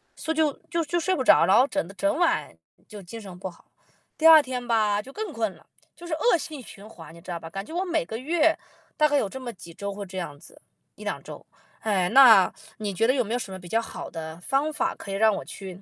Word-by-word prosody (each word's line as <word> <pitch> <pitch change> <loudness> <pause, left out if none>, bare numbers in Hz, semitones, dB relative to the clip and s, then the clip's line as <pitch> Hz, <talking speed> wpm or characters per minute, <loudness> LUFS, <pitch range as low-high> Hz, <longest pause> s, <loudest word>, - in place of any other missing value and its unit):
所 320 - -4
以 - - -10
就 310 -3 +3 0.2
就 335 -1 0
就 345 +3 0
睡 370 +3 +1
不 265 - -1
着， - - +6
然 190 - +5
后 255 - +6
整 170 - -2
的 - - -10
整 300 - 0
晚 335 -1 +1 0.3
就 210 -2 -10
精 195 +5 -9
神 190 -4 -10
不 190 - -5
好。 175 - -19 0.5
第 320 - +5
2 320 -1 +10
天 250 -2 -5
吧， 215 -3 +2
就 260 - -13
更 420 0 -5
困 225 -4 -1
了， - - -21 0.3
就 345 - -12
是 340 - -4
恶 345 +5 +3
性 305 -3 -7
循 210 -3 -12
环， 165 -7 -13
你 - - -13
知 180 - -8
道 170 - -4
吧？ 165 - -9
感 195 +3 -6
觉 320 - -10
我 355 +2 0
每 330 -7 0
个 220 - -7
月 320 +4 +2 0.4
大 305 - +5
概 290 -1 +2
有 220 - +1
这 265 +6 -8
么 245 -2 -5
几 170 -3 -12
周 200 +4 -5
会 200 0 -7
这 190 0 -9
样 160 -5 -6
子， - - -17 0.3
1-2 - - -5
周， - - -10 0.4
哎， 190 -5 0
那 230 -6 +7 0.2
你 210 -2 -3
觉 225 +5 +2
得 255 - +4
有 255 - +2
没 220 +1 -4
有 245 - 0
什 205 - -6
么 190 - -6
比 180 -1 -12
较 225 +5 +1
好 230 - -7
的 160 0 -7
方 275 +9 0
法， 335 +2 -1
可 - - -11
以 - - -2
让 215 +1 +4
我 - - -5
去 190 -1 -9
230 Hz, 285 characters per minute, -25 LUFS, 195-305 Hz, 0.5 s, 2